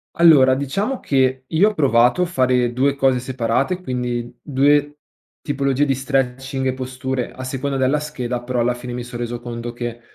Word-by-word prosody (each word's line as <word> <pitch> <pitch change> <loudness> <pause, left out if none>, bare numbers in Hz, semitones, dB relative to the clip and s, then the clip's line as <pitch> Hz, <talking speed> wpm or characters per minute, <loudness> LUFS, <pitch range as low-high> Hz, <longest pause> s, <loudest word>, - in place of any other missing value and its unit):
Allora, 145 -6 +6
diciamo 195 - -2
che 130 -1 +1
io 165 +9 +3
ho 215 - -7
provato 130 +1 +3
a - - +4
fare 125 -7 +1
2 135 +3 +1
cose 135 -2 +2
separate, 130 +7 -1
quindi 125 -4 -3
2 145 +1 +2 0.5
tipologie 140 -1 0
di 135 -2 +1
stretching 135 0 -2
e 130 - +1
posture 130 0 -4
a 130 - -8
seconda 135 +2 -3
della 135 +3 +1
scheda, 125 -5 -4
però 125 0 -2
alla 120 +1 +1
fine 125 0 -7
mi 125 0 -4
son 120 0 -7
reso 120 0 -3
conto 120 0 -6
che 120 -1 -5
130 Hz, 175 wpm, -20 LUFS, 125-140 Hz, 0.5 s, Allora